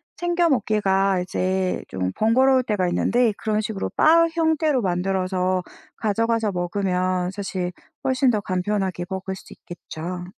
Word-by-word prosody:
챙겨 345 0 +1
먹기가 195 -6 +2
이제 185 +1 -1
좀 95 0 -2
번거로울 255 +4 +4
때가 205 -6 0
있는데 235 +5 +2
그런 215 0 0
식으로 215 -2 -3
바 335 +1 +6
형태로 320 -5 +1
만들어서 185 0 0 0.3
가져가서 225 0 0
먹으면 180 0 -1
사실 190 -3 -3 0.3
훨씬 260 0 +2
더 215 - +2
간편하게 185 -1 -2
먹을 190 0 -4
수 - - -13
있겠죠. 175 +1 -7
195 Hz, 300 characters per minute, -23 LUFS, 185-230 Hz, 0.3 s, 바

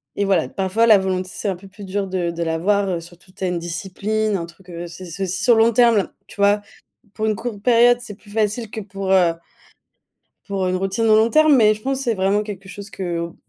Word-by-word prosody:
Et 200 - 0
voilà, 190 -5 +1
parfois, 195 +4 +1
la 215 -2 +8
volonté, 185 -1 -2
c'est - - -5
un 195 - 0
peu 190 +3 -14
plus 200 +1 -11
dur 195 +1 -2
de 180 -2 -2
de 170 0 -3
l'avoir, 190 +5 +1
heu. 175 -2 -1
Surtout, 175 +2 -15
tu 190 - -9
as - - +1
une 180 -1 -1
discipline, 200 +5 -2
un 170 -3 -2
truc, 180 +2 -18
heu 175 0 -6
c 175 +2 -10
c'est 180 +3 -5
aussi 190 +1 -3
sur 240 0 +5
le 225 - +5
long 230 - +4
terme, 230 -4 +4 0.2
tu - - -14
vois? 205 +1 +4 0.5
Pour 215 - -2
une 215 -1 +1
courte 215 -1 -6
période, 240 +1 +5
c'est 225 -4 -8
plus 210 0 -20
facile 220 +1 -1
que 220 - -6
pour, 195 -1 -4
heu 180 -3 +4 1.1
pour 195 -2 -1
une 185 - 0
routine 195 +4 -1
au 215 -1 +5
long 220 +1 +4
terme. 310 +2 +5
Mais 215 -4 +5
je 215 - -11
pense 270 +2 -2
c'est 240 -4 0
vraiment 195 +1 +1
quelque 195 -3 -8
chose 200 +1 -9
qu'au 170 -2 -4
195 Hz, 245 wpm, -21 LUFS, 185-215 Hz, 1.1 s, la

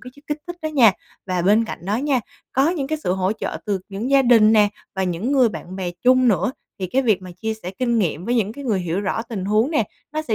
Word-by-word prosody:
cái 250 - -10 0.2
kích 295 0 -2
thích 350 0 -6
đó 310 - -1
nha. 245 -9 +5 0.3
Và 180 -2 -1
bên 210 +5 +4
cạnh - - -6
đó 210 +2 +1
nha, 270 -1 +1 0.3
có 270 +4 +3
những 290 -7 -2
cái 310 +1 -2
sự 180 - +1
hỗ 190 +2 0
trợ 220 - -4
từ 200 -3 -1
những 215 +6 -4
gia 275 -1 +5
đình 225 -3 +6
nè 210 -2 +5 0.3
và 190 - -1
những 185 +10 -2
người 255 -4 +5
bạn 185 -2 -8
bè 180 -2 -3
chung 255 0 +5
nữa, 195 +4 +1 0.3
thì 185 - -2
cái 265 +9 +1
việc 210 -6 +2
mà 185 - -9
chia 220 +5 -3
sẻ 185 -4 -7
kinh 235 -2 +1
nghiệm 175 -3 -1
với 240 +2 0
những 215 -2 +1
cái 280 +2 -9
người 210 -6 0
hiểu 175 +2 -2
rõ 205 +3 -1
tình 220 -5 -5
huống 215 +8 +2
nè, 260 -9 +2 0.3
nó 310 0 -2
sẽ 230 -7 -1
220 Hz, 275 wpm, -21 LUFS, 190-255 Hz, 0.3 s, đình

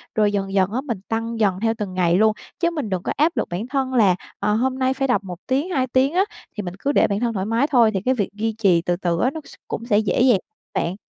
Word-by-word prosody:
rồi 210 -1 +3
dần 195 -1 -2
dần 190 0 +2
á, 250 +4 -1
mình 240 -8 -4
tăng 225 0 -2
dần 195 -4 +2
theo 225 +1 +1
từng 205 -4 -4
ngày 175 -2 +2
luôn, 215 +1 +4 0.3
chứ 340 - +2
mình 295 -10 -3
đừng 185 -2 -2
có - - -2
áp 320 +4 +2
lực - - -1
bản 185 +7 -4
thân 265 -1 -1
là, 205 -7 +4 0.2
ờ, 210 +1 +1
hôm 260 +3 0
nay 260 0 +2
phải 270 0 -1
đọc 245 -6 +1
1 180 -2 -7
tiếng, 275 +7 0
2 265 -8 0
tiếng 260 +4 +2
á, 370 +2 +4 0.3
thì 210 - -2
mình 175 -1 -5
cứ 280 - 0
để - - +4
bản 200 0 -1
thân 235 0 0
thoải 190 -2 -2
mái 230 +6 +1
thôi, 240 -7 +4
thì 190 - -1
cái 260 - +3
việc 210 -6 -1
duy 220 +2 -2
trì 190 -6 +3
từ 175 +1 0
từ 175 -2 -1
á 255 - +3
nó 320 - -6
s - - -13
cũng 230 - -5
sẽ 215 -4 +2
dễ 215 +1 0
dàng 245 -6 +5 0.3
bạn. 170 +2 -1
225 Hz, 290 wpm, -22 LUFS, 195-260 Hz, 0.3 s, dàng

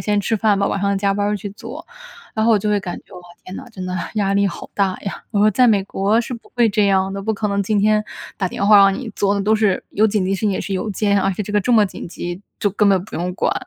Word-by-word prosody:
是 - - -9
先 205 -1 +2
吃 220 +3 0
饭 210 -2 +2
吧， 200 - +1
晚 200 - -1
上 200 0 +1
加 195 0 +1
班 205 0 -1
儿 210 0 0
去 200 +1 -7
做。” 205 - -10 0.5
然 220 0 0
后 - - +4
我 215 - +5
就 210 +1 -1
会 205 - +1
感 180 -2 -5
觉： - - -22
“哇， 180 - -9 0.2
天 185 - -9
哪， 245 - -8
真 190 -5 -8
的， 185 0 -4 0.2
压 200 -2 +1
力 200 0 +2
好 - - -9
大 195 -2 0
呀。” 195 - -6
我 210 - -1
说： 210 +1 +5
“在 250 +4 +4
美 200 -3 +2
国 200 +3 +1
是 240 +2 -2
不 235 - -9
会 240 - +4
这 210 -1 +2
样 190 0 +2
的， 195 - -4
不 220 +2 -1
可 210 +1 -2
能 200 0 0
今 210 +2 0
天 210 +1 +3 0.4
打 185 -3 0
电 200 - -2
话 210 0 +8
让 195 -1 +6
你 245 -2 -6
做 200 0 +1
的， 200 - -1
都 215 +2 +3
是 210 -3 +1
有 215 +2 +3
紧 205 -3 0
急 195 +1 0
事 - - -4
情 215 - +1
也 190 - -2
是 200 - -4
邮 190 +3 -2
件， 200 0 +1
而 - - +1
且 195 +2 -3
这 205 - -7
个 210 - +3
这 245 - -2
么 220 -3 +5
紧 185 - -7
急 175 +1 -6 0.2
就 205 - +1
根 205 +1 +2
本 190 -2 +2
不 - - -11
用 175 +2 -2
管。” - - 0
200 Hz, 340 characters per minute, -19 LUFS, 195-215 Hz, 0.5 s, 话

